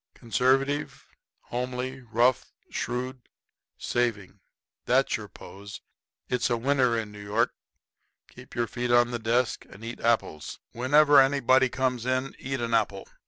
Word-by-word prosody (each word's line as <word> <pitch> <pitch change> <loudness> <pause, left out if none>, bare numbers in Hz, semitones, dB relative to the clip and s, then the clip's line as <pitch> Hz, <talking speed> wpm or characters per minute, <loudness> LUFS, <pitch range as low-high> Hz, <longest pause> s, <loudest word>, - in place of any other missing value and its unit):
Conservative, 135 +4 0 0.4
homely, 125 +2 -4
rough, 120 +2 +1 0.2
shrewd, 125 +1 -4 0.5
saving 105 -5 -2 0.5
that's - - +3
your - - -6
pose. 100 +1 -11 0.5
It's 125 0 0
a 120 - +1
winner 125 -1 +2
in 110 -2 -4
New 105 0 -10
York. 105 +3 0 0.7
Keep - - -14
your 120 - +1
feet 120 +2 -4
on 120 0 +4
the 120 - -3
desk 115 +2 0
and 110 +3 -12
eat 115 - -6
apples. 115 -10 0
Whenever 145 +4 +5
anybody 130 -1 +3
comes 125 -1 -1
in 130 +1 -1
eat 135 -1 -3
an 115 0 -2
apple. 100 -3 0
120 Hz, 135 wpm, -27 LUFS, 115-130 Hz, 0.7 s, Whenever